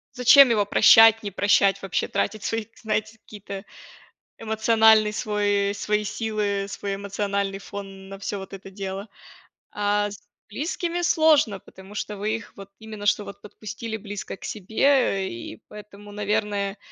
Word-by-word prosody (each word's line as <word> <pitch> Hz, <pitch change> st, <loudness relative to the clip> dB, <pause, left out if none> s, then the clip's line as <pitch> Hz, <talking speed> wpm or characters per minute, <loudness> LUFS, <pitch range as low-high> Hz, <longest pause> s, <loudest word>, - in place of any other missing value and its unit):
Зачем 250 Hz, +2 st, +7 dB
его 210 Hz, -3 st, +2 dB
прощать, 225 Hz, +2 st, +6 dB
не 200 Hz, -, -4 dB
прощать, 195 Hz, 0 st, +2 dB
вообще, 195 Hz, -, -2 dB
тратить 215 Hz, -2 st, -2 dB
свои, 225 Hz, -1 st, -2 dB, 0.2 s
знаете, 215 Hz, 0 st, -2 dB
какие-то 200 Hz, -2 st, -9 dB, 0.8 s
эмоциональный 220 Hz, -1 st, +3 dB
свой 205 Hz, -1 st, 0 dB
свои 210 Hz, +1 st, -1 dB
силы, 205 Hz, -2 st, -2 dB
свой 200 Hz, 0 st, -4 dB
эмоциональный 200 Hz, 0 st, -3 dB
фон 195 Hz, -1 st, -9 dB
на 195 Hz, 0 st, -9 dB
всё 200 Hz, +1 st, -4 dB
вот 190 Hz, -1 st, -10 dB
это 195 Hz, 0 st, -10 dB
дело. 195 Hz, +1 st, -6 dB, 0.6 s
А 205 Hz, 0 st, 0 dB
с 200 Hz, -, -10 dB, 0.3 s
близкими 335 Hz, -, -3 dB
сложно, 315 Hz, -, +3 dB
потому 190 Hz, +2 st, -15 dB
что 210 Hz, 0 st, -4 dB
вы 215 Hz, +2 st, -1 dB
их 225 Hz, -, -9 dB
вот 195 Hz, 0 st, -11 dB
именно, 215 Hz, -2 st, -9 dB
что 210 Hz, -, +2 dB
вот 200 Hz, -, -11 dB
подпустили 220 Hz, +2 st, -7 dB
близко 205 Hz, -2 st, -7 dB
к -, -, -17 dB
себе, 215 Hz, +1 st, -4 dB, 0.4 s
э, -, -, -3 dB
и 115 Hz, -1 st, -9 dB
поэтому, 205 Hz, -1 st, -12 dB
наверное 205 Hz, -1 st, -2 dB
205 Hz, 150 wpm, -24 LUFS, 200-220 Hz, 0.8 s, Зачем